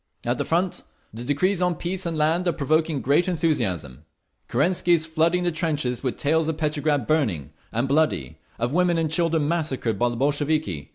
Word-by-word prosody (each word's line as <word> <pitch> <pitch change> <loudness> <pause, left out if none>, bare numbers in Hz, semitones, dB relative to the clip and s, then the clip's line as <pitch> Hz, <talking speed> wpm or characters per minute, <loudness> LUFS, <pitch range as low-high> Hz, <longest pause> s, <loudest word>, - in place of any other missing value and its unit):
"At - - 0
the - - -1
front, 175 +2 0 0.3
the 115 +2 -7
decrees 175 +8 0
on 180 -1 +1
Peace 180 +2 -3
and 165 -2 -3
Land 160 +4 +1
are 175 - +2
provoking 155 -1 0
great 145 +7 +3
enthusiasm. 95 - -1 0.4
Kerensky 175 +6 +2
is 160 -2 +2
flooding 165 +2 +1
the 175 - +1
trenches 150 -7 -1
with 130 -3 -2
tales 160 +2 +1
of 160 -1 -2
Petrograd 150 -4 0
burning 105 - 0 0.2
and 120 +4 -1
bloody, 140 - 0 0.2
of 120 +3 -2
women 175 0 +2
and 160 -2 0
children 165 -2 +1
massacred 145 - -1
by 120 0 +2
the 120 - -4
Bolsheviki. 145 - -1
155 Hz, 180 wpm, -24 LUFS, 130-170 Hz, 0.4 s, great